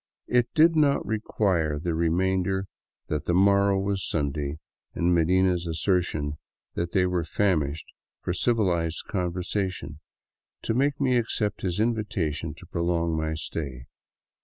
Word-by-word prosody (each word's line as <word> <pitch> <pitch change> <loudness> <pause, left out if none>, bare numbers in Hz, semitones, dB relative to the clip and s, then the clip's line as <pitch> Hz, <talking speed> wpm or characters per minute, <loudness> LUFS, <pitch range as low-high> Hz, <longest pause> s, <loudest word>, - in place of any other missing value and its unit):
It 120 -1 +2
did 165 +1 +6
not 145 -3 +3
require 95 -8 0
the 85 +3 -2
reminder 95 +3 +1 0.4
that 75 -1 -3
the 85 - +1
morrow 100 +1 +4
was 100 -1 -1
Sunday, 75 -1 -2 0.4
and 85 +1 +2
Medina's 90 +1 +2
assertion 80 -3 0 0.3
that 85 0 -2
they 90 -1 +3
were 90 -2 0
famished 80 -4 0 0.4
for 90 - -1
civilized 90 -7 +1
conversation, 90 -3 -3 0.6
to - - 0
make 140 +4 +1
me 130 -3 +3
accept 110 -2 -1
his 90 0 -1
invitation 95 -9 -1
to - - -13
prolong 85 -1 0
my 80 0 -1
stay. 70 -5 -5
90 Hz, 130 wpm, -26 LUFS, 80-100 Hz, 0.6 s, did